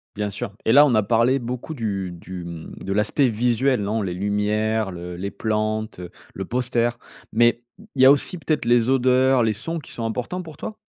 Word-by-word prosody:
Bien 105 0 -2
sûr 110 +2 -5
et - - +3
là 145 +4 +8
on 130 -5 +2
a 110 - +3
parlé 115 +5 +3
beaucoup 125 +5 -5
du 100 -7 -3
du, 90 +1 -8
mmh, 85 -2 -8
de 95 - -2
l'aspect 105 +7 +2
visuel 120 +2 +1
non? 105 +2 -1
Les 95 -3 -2
lumières 105 +2 0
le 90 0 -7
les 95 +3 -4
plantes, 110 -2 -2
heu, 90 - -7 0.2
le 95 - -5
poster 120 0 0 0.4
mais 120 +1 +3 0.3
il 130 - +1
y 130 - +8
a 135 - +9
aussi 160 +6 +1
peut-être 155 -4 -1
les 120 0 +3
odeurs, 130 -1 +3
les 110 - +2
sons 165 +11 -4
qui 145 - -11
sont 115 - -4
importants 125 +11 -3
pour 160 -4 -11
toi? 215 - -7
115 Hz, 210 wpm, -23 LUFS, 105-130 Hz, 0.4 s, a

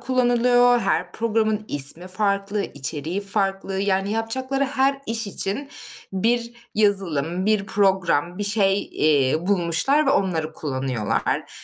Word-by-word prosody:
kullanılıyor. 245 -1 +3
Her 185 -3 -1
programın 220 -1 0
ismi 145 +5 -1
farklı, 200 +1 -1
içeriği 150 +5 -4
farklı, 195 -1 -1
yani, 195 0 0
yapacakları 260 +5 -1
her 275 0 +1
iş 225 0 +2
için 200 +7 -2 0.4
bir 235 +4 0 0.2
yazılım, 185 -4 +1
bir 210 -2 +1
program, 190 -4 +1
bir 205 - -1
şey, 200 -1 +2
iii, 150 +2 +1
bulmuşlar 195 - +2
ve - - +4
onları 170 - 0
kullanıyorlar. 130 -7 -2
200 Hz, 120 wpm, -22 LUFS, 175-225 Hz, 0.4 s, ve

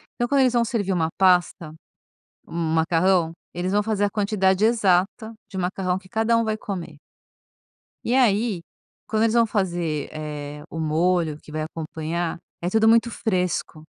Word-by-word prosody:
Então 240 - -1
quando 280 +1 +3
eles 255 -2 +3
vão 240 -1 +3
servir 205 -5 -1
uma 165 -3 +1
pasta, 180 -4 +2 0.7
um 165 -1 -2
macarrão, 165 +1 +2 0.2
eles 180 +2 -2
vão 205 +1 +3
fazer 210 -1 0
a - - 0
quantidade 200 -2 +1
exata 215 0 +1 0.2
de 190 - -7
macarrão 185 0 -1
que 190 0 -13
cada 225 +3 +2
um 230 - +2
vai 215 -1 -1
comer. 180 -7 -6 1.1
E 235 - +1
aí, 225 -6 +2 0.5
quando 220 0 +1
eles 225 -1 +2
vão 235 -1 +4
fazer, 175 -8 -1
eh, 150 -1 -6
o 165 - -6
molho 160 0 +1
que - - -14
vai 155 0 -3
acompanhar, 160 +1 -4 0.2
é 175 - -1
tudo 220 +3 +3
muito 230 +1 +5
fresco. 180 -8 -2
185 Hz, 165 wpm, -23 LUFS, 165-220 Hz, 1.1 s, muito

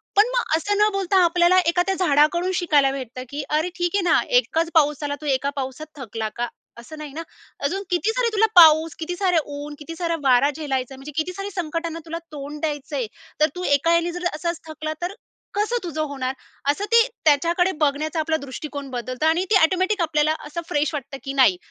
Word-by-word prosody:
पण 415 +3 +6
मग 480 -10 +1
असं 410 +5 -1
न 420 +1 +4
बोलता, 385 -1 +2
आपल्याला 350 +2 +4
एखाद्या 355 +3 +2
झाडाकडून 305 +6 +3
शिकायला 290 -5 +3
भेटतं 255 -2 -6
की 285 0 -4
अरे 310 +4 +1
ठीक 350 +1 -1
आहे 400 - +3
ना. 355 - +4 0.2
एकच 330 -7 -1
पाऊस 295 -2 +3
आला. 285 0 -2
तू - - -8
एकाच 280 +1 0
पावसात 275 +3 -5
थकला 225 -4 -4
का? 240 0 -2 0.3
असं 310 +7 -11
नाही 300 -2 -8
ना. 325 - -5 0.4
अजून 390 +6 -1
किती 360 +5 +1
सारे - - +1
तुला 440 +1 +4
पाऊस, 320 -2 +7
किती 350 +2 -3
सारे 360 -3 +1
ऊन, 290 +1 -7
किती 330 +2 -8
सारा 335 -1 -1
वारा 265 +1 +4
झेलायचं 270 -4 -3
आहे. - - -11
म्हणजे 270 +3 -9
किती 330 +3 -1
साऱ्या 395 +2 -5
संकटांना 330 0 -4
तुला 330 0 -5 0.2
तोंड 295 +1 -7
द्यायचंय. 290 -5 -3 0.3
तर 305 - +5
तू 360 - -5
एका 305 +2 +3
याने 340 +1 +1
जर 355 +1 -6
असाच 340 +2 -3
थकला 310 0 -4
तर 355 +2 -3 0.4
कसं 420 +4 0
तुझं 320 -3 -3
होणार? 265 -2 -3 0.4
असं 400 +8 -3
ते, 465 +1 +6 0.2
त्याच्याकडे 340 +5 +3
बघण्याचा 305 +2 0
आपला 315 0 +1
दृष्टिकोन 280 0 -7
बदलतं 255 +3 -3
आणि 330 +3 +2
ती - - +5
ऑटोमॅटिक 370 +4 +2
आपल्याला 310 -1 +2
असं 320 +3 -5
फ्रेश 295 +1 0
वाटतं 275 -1 -5
की 275 - -4
नाही. 255 -10 +4
315 Hz, 200 wpm, -23 LUFS, 285-350 Hz, 0.4 s, पाऊस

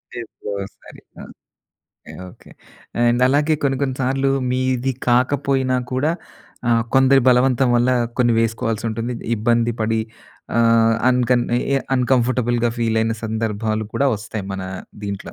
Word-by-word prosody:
లేదు 120 -2 -7 0.2
ఒకసారి 100 0 -9 0.2
ఆ! - - -9 0.6
ఓకే. - - -16 0.2
ఓకే. - - -19 0.5
అండ్ 120 +1 +2
అలాగే 145 +3 +2
కొన్ని 135 -1 +1
కొన్ని 130 -2 -1
సార్లు 135 +1 +1 0.2
మీది 130 0 0 0.2
కాకపోయినా 130 +1 +1 0.2
కూడా 135 +5 +1 0.6
ఆహ్, 115 -1 +3
కొందరి 135 0 +5
బలవంతం 125 0 +3
వల్ల 120 +2 +2 0.3
కొన్ని 120 -1 +3
వేసుకోవాల్సి 115 0 -1
ఉంటుంది. 115 +2 -3 0.2
ఇబ్బంది 115 +2 +1
పడి 110 +1 0 0.6
ఆహ్, 115 -1 +4
అన్కన్ 125 -1 +2 0.5
అన్‌కంఫర్టబుల్‍గా 120 -2 +1
ఫీలైన 115 -1 +1
సందర్భాలు 110 0 -2
కూడా 140 - +1
వస్తాయి 105 -1 -6
మన 95 -1 -5 0.4
దింట్లో. 100 -1 -6
120 Hz, 120 wpm, -20 LUFS, 115-130 Hz, 0.6 s, కొందరి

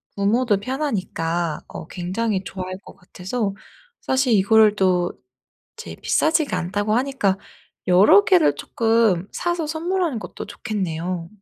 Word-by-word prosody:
부모도 210 +2 +2
편하니까 185 - -2
어 - - -9
굉장히 190 +3 -2
좋아할 185 -1 -6
것 - - -13
같아서 195 +3 -4 0.5
사실 265 -1 +1
이거를 215 +1 +5
또 180 -2 +2 0.7
이제 - - -8
비싸지가 315 -1 +1
않다고 205 +5 -1
하니까 250 -7 0 0.5
여러 190 +2 +6
개를 155 -6 +4
쪼끔 225 -1 +1
사서 345 -2 -2
선물하는 330 -3 -1
것도 - - -8
좋겠네요. 180 -5 -4
205 Hz, 285 characters per minute, -22 LUFS, 180-245 Hz, 0.7 s, 여러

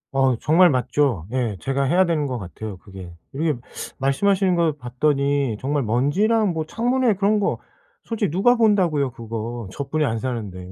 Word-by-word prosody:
어 135 -2 +3
정말 175 +4 +5
맞죠. 130 - 0
예. 125 -5 -1
제가 135 +1 -1
해야 175 +8 +3
되는 160 -4 0
것 130 -2 -3
같아요, 100 +1 -7
그게. 95 -3 -11 0.2
이렇게 150 0 -1 0.4
말씀하시는 185 +7 +2
걸 165 -2 +2
봤더니 140 0 0
정말 140 +1 0
먼지랑 190 - +2
뭐 160 -2 -3
창문에 245 +5 +1
그런 205 +2 +2
거 200 - -1 0.4
솔직히 225 -3 -2
누가 195 +10 +3
본다고요 180 - +2
그거 115 -1 -6
저뿐이 140 +7 -2
안 115 -5 -1
사는데 105 -8 -5
140 Hz, 335 characters per minute, -22 LUFS, 120-180 Hz, 0.4 s, 정말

